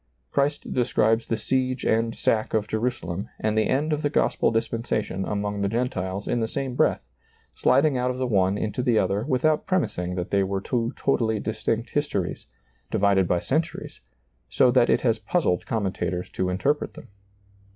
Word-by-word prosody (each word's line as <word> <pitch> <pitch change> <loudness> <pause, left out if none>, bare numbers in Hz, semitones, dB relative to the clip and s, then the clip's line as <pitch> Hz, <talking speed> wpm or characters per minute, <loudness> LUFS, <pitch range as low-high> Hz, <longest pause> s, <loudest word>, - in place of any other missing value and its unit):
Christ 140 +1 0
describes 115 -2 +2
the 115 - 0
siege 130 +2 -1
and 115 +1 +1
sack 110 0 0
of 105 -1 +1
Jerusalem 110 -4 -2
and 110 0 0
the 110 - +2
end 150 +3 +1
of 150 - -1
the 145 - +1
gospel - - +2
dispensation 115 -4 -1
among 105 0 -2
the 100 - +1
Gen 120 +4 0
tiles 95 +1 -4
in 120 - 0
the 110 - 0
same 135 +1 -3
breath, - - +2 0.5
sliding 140 -2 +3
out 125 0 +1
of 125 - -3
the 130 - -1
one 100 -4 +2
into 110 +4 -2
the 120 -3 +2
other 100 +1 +1
without 150 +4 +1
premising 90 - -1
that 90 -1 -4
they 100 - +3
were 95 0 -1
two 115 +3 -1
totally 110 -5 +1
distinct 110 +2 -2
histories, 145 -12 -2 0.4
divided 95 -2 +3
by 85 0 +1
centuries, 160 +4 -2 0.5
so 125 - +4
that 125 -1 +4
it - - +3
has 115 -3 +1
puzzled 105 - 0
commentators 95 -4 -2
to 95 - -1
interpret 135 +12 -1
him. - - -11
115 Hz, 175 wpm, -25 LUFS, 100-130 Hz, 0.5 s, so